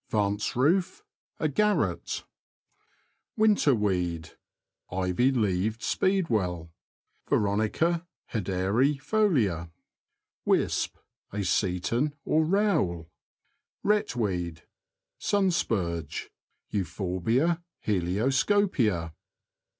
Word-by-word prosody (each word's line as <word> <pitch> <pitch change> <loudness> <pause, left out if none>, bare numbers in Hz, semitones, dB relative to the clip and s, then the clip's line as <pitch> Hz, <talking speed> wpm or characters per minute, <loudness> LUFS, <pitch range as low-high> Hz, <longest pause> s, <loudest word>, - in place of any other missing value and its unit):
Vance 105 -1 0
roof. 170 +9 +2 0.2
— - - -48
A 155 - +1
garret. 210 +8 0 1.1
Winter 210 - +4
weed. 90 -6 -1 0.3
— - - -40
Ivy 95 +8 +1
leaved 110 -1 0
speedwell 110 - 0 0.6
[Veronica 110 - +1 0.3
hederi 105 +7 +1
folia). 130 - +1 0.7
Wisp. - - +1 0.2
— - - -49
A 100 0 -2
seton 100 - 0
or 160 - +3
row^el. 155 - +1 0.7
Wret 210 -7 +1
WEED. 90 -8 -2 0.3
— - - -62
Sun 195 -2 +3
spurge 85 - -2 0.4
{Euphorbia 100 - 0 0.2
helioscopia). 105 - +1
110 Hz, 80 wpm, -28 LUFS, -, 1.1 s, Winter